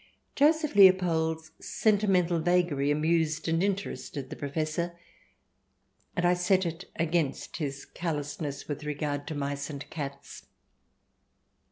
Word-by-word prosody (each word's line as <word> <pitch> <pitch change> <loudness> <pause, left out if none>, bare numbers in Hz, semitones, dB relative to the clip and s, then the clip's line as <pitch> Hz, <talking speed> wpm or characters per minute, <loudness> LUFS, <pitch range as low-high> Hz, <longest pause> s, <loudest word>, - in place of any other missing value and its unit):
Joseph 305 +1 +3
Leopold's 165 -5 +4
sentimental 195 -5 +2
vagary 170 -4 +2
amused 155 +1 +1
and 165 +1 +2
in 200 0 +3
terested 145 -8 -6
the - - -4
Professor, 155 +4 -2 1.2
and 175 - +1
I 175 - +5
set 185 +1 +2
it 170 +2 -5
against 165 -3 -1
his 140 -4 -4
callousness 145 -3 -4
with 145 0 -4
regard 145 -1 -3
to 155 - -4
mice 140 0 -3
and 140 -2 -7
cats. 140 -3 -7
160 Hz, 120 wpm, -29 LUFS, 145-180 Hz, 1.2 s, I